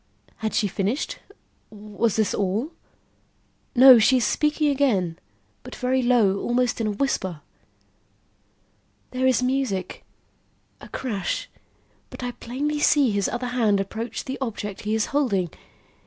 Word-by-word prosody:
Had 220 -1 -3
she 215 -4 +2
finished? 200 - -2 0.5
Was 210 +1 -2
this 220 -2 +1
all? 205 - -1 1.0
No; 255 -1 +9
she 255 +4 +4
is 245 - +1
speaking 300 0 +1
again, 205 -12 0 0.4
but - - -10
very 255 +1 0
low, 230 -6 +3
almost 245 -1 0
in 220 - 0
a - - 0
whisper. 190 - -2 1.7
"There 255 +1 0
is 255 -1 +2
music 250 -8 -2 0.8
a - - -11
crash 205 -8 -3 0.6
but - - -9
I 245 - -2
plainly 285 +6 -3
see 290 -4 +4
his 200 -1 0
other 245 0 -3
hand 225 -5 +2
approach 220 +3 -4
the 265 0 -5
object 210 -5 -4
he 215 +1 0
is 220 - +1
holding. 200 - +1
235 Hz, 135 wpm, -24 LUFS, 205-260 Hz, 1.7 s, No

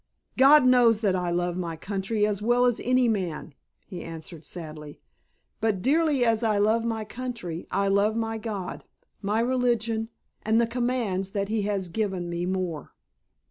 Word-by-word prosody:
"God 275 +2 +7
knows 240 -3 +5
that 200 -4 +2
I 180 -1 -1
love 175 0 -1
my 170 -2 -3
country 200 +5 -1
as 210 -1 -1
well 240 +3 +3
as 245 -2 +1
any 250 0 +3
man," 180 -8 -2 0.3
he 180 -4 -8
answered 165 0 -9
sadly. 155 -2 -8 0.6
"But 215 -4 0
dearly 290 -1 +3
as 225 -1 +2
I 215 -2 +2
love 220 +3 +2
my 225 -2 -2
country 230 -8 -6
I 200 +1 0
love 200 +2 +2
my 225 -1 -2
God, 205 -5 -5 0.4
my 210 +2 0
religion 235 -3 0 0.3
and 220 +1 +2
the 235 - +4
commands 230 -5 -1
that 200 0 -1
He 220 0 0
has 195 -3 -1
given 175 -3 -2
more." 180 -6 -4
210 Hz, 160 wpm, -26 LUFS, 185-235 Hz, 0.6 s, God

